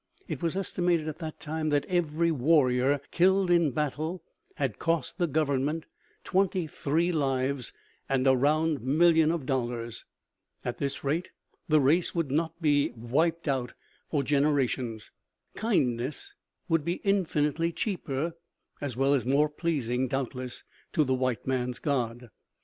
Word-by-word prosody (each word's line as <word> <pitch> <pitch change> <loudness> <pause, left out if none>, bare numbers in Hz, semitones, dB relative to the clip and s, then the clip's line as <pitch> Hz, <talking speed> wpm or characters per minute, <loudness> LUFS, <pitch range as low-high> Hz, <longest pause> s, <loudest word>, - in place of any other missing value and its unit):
It - - -4
was 170 0 0
estimated 175 -4 0
at 155 +1 -5
this 160 -2 -5
time 155 0 -2
that 145 -1 +1
every 170 -2 +1
warrior 135 -2 +3
killed 190 +1 +3
in 170 -3 +4
battle 155 +5 -2 0.3
had 135 -7 -2
cost 165 -5 -1
the 175 - +2
Government 150 +1 0 0.4
twenty 185 -2 +1
three 160 +3 0
lives 135 -4 -1 0.4
and 135 -1 +1
a 130 -1 +6
round 150 +2 +2
million 160 +4 +4
of 165 -4 -1
dollars. 120 -3 -3 0.6
At 120 - -3
this 140 -1 -2
rate, 155 +6 -1 0.4
the 155 0 +5
race 155 +7 +2
would 165 -6 -1
not 165 +3 -1
be 145 -3 +3
"wiped 155 +9 0
out" 130 -3 -1 0.4
for 145 -3 +1
generations. 135 -6 0 0.4
Kindness 150 - 0 0.3
would 165 -4 +2
be 170 +3 -1
infinitely 165 -5 +1
cheaper, 165 -5 -2 0.5
as 135 -5 -3
well 135 +1 +3
as 135 - +2
more 140 +4 +3
pleasing, 135 -6 -1
doubtless, 130 -1 -4 0.3
to 155 - +4
the 130 -2 0
white 130 -2 -1
man's 125 -1 -1
God! 120 -5 -2
150 Hz, 140 wpm, -28 LUFS, 130-165 Hz, 0.6 s, a